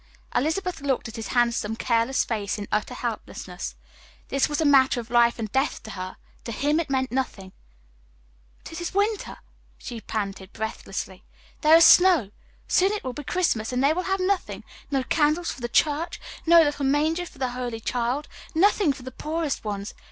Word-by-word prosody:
Elizabeth 350 Hz, +5 st, 0 dB
looked 270 Hz, -3 st, -1 dB
at 225 Hz, -, -9 dB
his 225 Hz, -3 st, -5 dB
handsome, 235 Hz, -3 st, +1 dB
careless 230 Hz, +3 st, +1 dB
face 210 Hz, -3 st, -2 dB
in 205 Hz, -1 st, -6 dB
utter 215 Hz, +4 st, -1 dB
helplessness. 210 Hz, -6 st, -5 dB, 0.5 s
This 275 Hz, +1 st, +1 dB
was 295 Hz, -, -1 dB
a 320 Hz, -, +2 dB
matter 270 Hz, -3 st, +5 dB
of 235 Hz, 0 st, -8 dB
life 235 Hz, -1 st, +4 dB
and 220 Hz, -3 st, -4 dB
death 270 Hz, +2 st, 0 dB
to 220 Hz, -, -8 dB
her; 185 Hz, -1 st, -6 dB, 0.3 s
to 235 Hz, -, -5 dB
him 290 Hz, +7 st, +1 dB
it 330 Hz, -, -3 dB
meant 260 Hz, -1 st, 0 dB
nothing. 225 Hz, -7 st, -3 dB, 1.1 s
"But -, -, -10 dB
it 325 Hz, -, -6 dB
is 345 Hz, +2 st, -4 dB
winter," 410 Hz, +1 st, 0 dB, 0.4 s
she 235 Hz, -3 st, -7 dB
panted, 195 Hz, -3 st, -4 dB
breathlessly; 195 Hz, -3 st, -5 dB, 0.4 s
"there 310 Hz, +1 st, +7 dB
is 330 Hz, -, +8 dB
snow. 355 Hz, -, +6 dB, 0.4 s
Soon 380 Hz, +2 st, +3 dB
it 425 Hz, -, -4 dB
will 255 Hz, -, -4 dB
be 295 Hz, -, -7 dB
Christmas, 260 Hz, -10 st, 0 dB
and 250 Hz, +1 st, 0 dB
they 285 Hz, +3 st, +4 dB
will 360 Hz, -, -1 dB
have 385 Hz, 0 st, +1 dB
nothing 375 Hz, +1 st, -1 dB, 0.3 s
no 270 Hz, -2 st, 0 dB
candles 310 Hz, +4 st, +1 dB
for -, -, -9 dB
the 240 Hz, -, -3 dB
church, 310 Hz, +6 st, +1 dB, 0.3 s
no 335 Hz, 0 st, +8 dB
little 290 Hz, -2 st, -1 dB
manger 310 Hz, +5 st, +1 dB
for -, -, -16 dB
the 260 Hz, -1 st, -1 dB
holy 245 Hz, -2 st, -4 dB
child, 245 Hz, +5 st, -1 dB, 0.3 s
nothing 370 Hz, -2 st, +4 dB
for 265 Hz, -1 st, -12 dB
the 260 Hz, -, -7 dB
poorest 310 Hz, +2 st, -3 dB
ones. 205 Hz, -1 st, -4 dB
265 Hz, 185 wpm, -25 LUFS, 230-320 Hz, 1.1 s, is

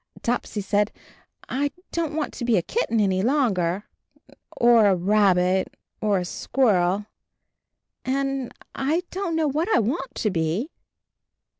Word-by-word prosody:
Topsy 235 Hz, -3 st, -1 dB
said, 205 Hz, +1 st, +1 dB, 0.6 s
"I 280 Hz, +3 st, 0 dB, 0.2 s
don't 325 Hz, -3 st, -2 dB
want 310 Hz, -2 st, -2 dB
to 250 Hz, -, -6 dB
be 235 Hz, -3 st, +3 dB
a 175 Hz, -, +1 dB
kitten 235 Hz, -, 0 dB
any 190 Hz, -3 st, +2 dB
longer, 205 Hz, -, +1 dB, 0.7 s
or 235 Hz, -3 st, +6 dB
a 195 Hz, -, +4 dB
rabbit, 185 Hz, -1 st, +2 dB, 0.2 s
or 210 Hz, -2 st, +2 dB
a 180 Hz, -, -2 dB
squirrel, 200 Hz, -4 st, +1 dB, 1.0 s
and 270 Hz, -1 st, -1 dB, 0.2 s
I 310 Hz, +6 st, 0 dB
don't 370 Hz, -3 st, -2 dB
know 320 Hz, -1 st, +2 dB
what 310 Hz, +7 st, -1 dB
I -, -, +5 dB
want 260 Hz, -, -1 dB
to 215 Hz, -, 0 dB
be." 175 Hz, -, -1 dB
225 Hz, 135 wpm, -24 LUFS, 190-275 Hz, 1.0 s, or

